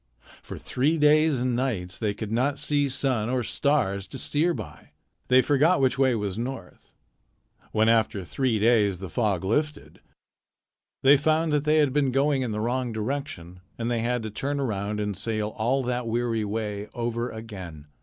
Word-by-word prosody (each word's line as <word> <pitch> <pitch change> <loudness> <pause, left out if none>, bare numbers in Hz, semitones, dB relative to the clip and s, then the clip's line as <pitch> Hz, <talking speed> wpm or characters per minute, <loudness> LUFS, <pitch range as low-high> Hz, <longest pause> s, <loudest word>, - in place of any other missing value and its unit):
For - - -9
three 145 +6 0
days 150 -1 +4
and 125 0 0
nights 110 -8 -2
they 105 -3 -1
could 110 0 -6
not 130 +5 +1
see 145 -1 0
sun 125 -4 0
or 125 -1 0
stars 110 -8 0
to 135 - -7
steer 150 +7 +1
by. 105 - -8 0.3
They 130 0 +5
forgot 150 +5 +3
which 135 0 +1
way 130 -3 +3
was 105 -1 -3
north. 120 -6 -7 0.8
When 110 0 +2
after 110 -4 +2
three 125 +3 0
days 105 -3 +3
the 95 0 -8
fog 105 -7 0
lifted, 150 +9 -2 1.0
they 140 +2 +7
found 155 +2 +1
that 150 0 +1
they 155 +1 +3
had 145 -4 +3
been 145 -2 +2
going 135 +1 +2
in 125 -3 -2
the 105 - -3
wrong 125 +1 -1
direction, 110 - -5 0.2
and 115 +1 -2
they 115 -1 0
had 120 0 -1
to 110 - -5
turn 140 +6 -2
around 105 -5 -2
and 105 -1 -2
sail 105 +2 -2
all 120 +5 0
that 125 -1 -2
weary 115 -1 -1
way 105 -1 -4
over 120 0 -2
again. 95 -10 -9
120 Hz, 175 wpm, -26 LUFS, 105-140 Hz, 1.0 s, they